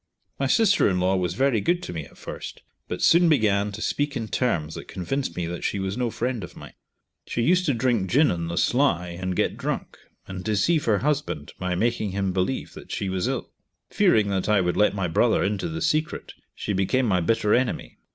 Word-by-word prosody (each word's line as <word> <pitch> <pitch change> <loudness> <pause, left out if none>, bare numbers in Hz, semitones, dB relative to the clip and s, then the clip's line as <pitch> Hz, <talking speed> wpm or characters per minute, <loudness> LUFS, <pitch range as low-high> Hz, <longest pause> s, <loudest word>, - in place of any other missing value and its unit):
My 135 - +1
sister 200 - +4
in 90 -1 0
law 95 +1 +2
was 90 -2 -1
very 130 -5 +2
good 175 - 0
to - - -6
me 80 -3 -5
at - - -18
first, - - -8 0.2
but - - -4
soon 170 +1 +6
began 105 -8 +2
to 110 - -5
speak 145 -1 -1
in 110 -2 -4
terms 80 -11 0
that - - -8
convinced 130 +9 -3
me 90 - -1
that 85 +1 -5
she - - -1
was 95 0 -2
no 125 -1 -1
friend 120 -1 -2
of 90 0 -9
mine. - - -11 0.5
She 120 - -1
used 180 +5 +3
to 145 - +3
drink 115 -5 +1
gin 145 - +4
on 85 -1 -3
the 85 +1 -4
sly, 120 -10 +2
and 90 +1 -4
get - - 0
drunk, - - -4 0.3
and 95 -1 -6
deceive 110 - +1
her 110 -3 +3
husband 145 - -1
by 90 -1 -1
making 110 0 0
him 95 -1 -1
believe 95 +8 -2
that - - -11
she 100 - -2
was 95 -1 -1
ill. - - -3 0.4
Fearing 105 -2 +3
that 95 +1 -1
I 105 -1 +4
would 90 -1 0
let 105 0 +3
my 95 -2 -1
brother 80 - +2
into 100 - -1
the 165 +2 -4
secret, 155 0 -1 0.2
she 105 - -3
became 100 +7 +1
my 95 -5 +2
bitter 105 +3 +2
enemy. 125 0 -1
105 Hz, 220 wpm, -25 LUFS, 95-130 Hz, 0.5 s, soon